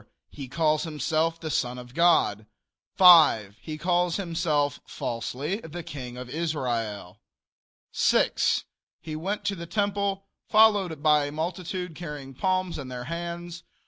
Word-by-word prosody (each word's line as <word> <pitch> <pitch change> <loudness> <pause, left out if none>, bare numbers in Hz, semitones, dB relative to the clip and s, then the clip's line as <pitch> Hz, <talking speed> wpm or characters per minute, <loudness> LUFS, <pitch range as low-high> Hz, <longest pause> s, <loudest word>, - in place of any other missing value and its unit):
He 140 -3 -8
calls 155 +2 +1
himself 160 +1 -1
the 160 -2 -5
son 125 -2 -1
of 125 0 -11
God. 130 - +3 0.5
5. 155 - +7
He 155 -1 -6
calls 175 +1 +1
himself, 165 -6 0
falsely, 130 - -3
the 175 -4 -8
King 125 -5 -8
of 125 0 -7
Israel. 120 - -3 0.7
6. - - +2 0.4
He 155 - -7
went 190 +7 -3
to 200 - 0
the 170 -2 -8
temple 200 -1 -1 0.2
followed 205 -8 +4
by 150 -2 +4
a 145 - -5
multitude 180 +2 -4
carrying 150 -5 -8
palms 185 +3 -1
in 135 - -6
their 125 -1 -6
hands. 170 +3 -6
160 Hz, 135 wpm, -26 LUFS, 135-175 Hz, 0.7 s, 5